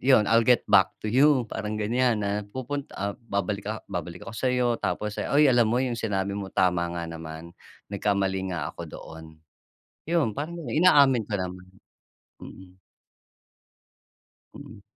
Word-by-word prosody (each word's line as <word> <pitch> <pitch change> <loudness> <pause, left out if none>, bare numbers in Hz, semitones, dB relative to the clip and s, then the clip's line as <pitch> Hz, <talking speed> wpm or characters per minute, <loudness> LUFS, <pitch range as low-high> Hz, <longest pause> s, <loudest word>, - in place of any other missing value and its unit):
yun 130 -5 +5
I'll 115 0 +4
get 125 -1 +5
back 95 -1 +5
to 110 - -1
you 135 +2 +4
parang 105 0 -4
gan'yan, 115 +1 +1
na 100 - -1 0.2
pupunt 130 +5 -5
ah, 100 0 -2
babalik 100 -3 -3
ah, 110 0 -4
babalik 85 -2 -5
ako - - -8
sa'yo, 125 0 +1
tapos 105 0 -3
"Ay 150 +1 +3
alam 120 -2 +4
mo 120 +2 +1
yung 120 -3 -2
sinabi 100 -3 -1
mo 100 -1 -4
tama 90 -2 +1
nga 85 - -3
naman, 80 0 -8 0.4
nagkamali 95 -2 0
nga 80 -5 -3
ako - - -8
doon". 80 0 -10 0.9
Yun 160 -10 +2
parang 170 +4 -5
inaamin 140 - +5
ko 105 - -3
naman, 90 0 -6 0.8
mm. 95 0 -13 1.8
Mm. 100 - -12
105 Hz, 150 wpm, -26 LUFS, 95-125 Hz, 1.8 s, yun